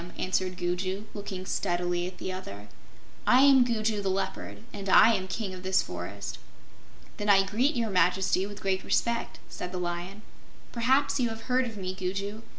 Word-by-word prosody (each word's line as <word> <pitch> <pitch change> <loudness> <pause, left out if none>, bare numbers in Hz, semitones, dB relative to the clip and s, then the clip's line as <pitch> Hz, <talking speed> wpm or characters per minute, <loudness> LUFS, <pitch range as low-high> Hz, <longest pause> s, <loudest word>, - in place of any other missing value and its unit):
answered 185 -1 -1
Gugu, 185 +3 -2
looking 195 -2 -6
steadily 175 -1 -1
at 180 0 -9
the 185 - -4
other. 105 - -8 0.6
"I 255 - +6
am 270 -2 +7
Gugu 220 -3 0
the 195 - -1
Leopard, 105 - -3
and 200 -1 -5
I 225 +4 +7
am 190 -3 -1
King 190 0 -4
of 185 - -8
this 190 +1 +2
forest." - - -6 0.8
"Then 210 -1 -2
I 195 -1 +6
greet 245 +10 +1
Your 230 -3 -1
Majesty 185 +1 +2
with 205 0 -9
great 190 -1 0
respect," 235 0 0
said 180 - -6
the 185 - -4
Lion. 180 +3 -4 0.5
"Perhaps 265 +4 +2
you 240 -2 +2
have 225 0 -7
heard 255 +1 +1
of 225 -2 -8
me, 185 -1 -4
Gugu. 195 +3 -4
195 Hz, 175 wpm, -28 LUFS, 185-220 Hz, 0.8 s, am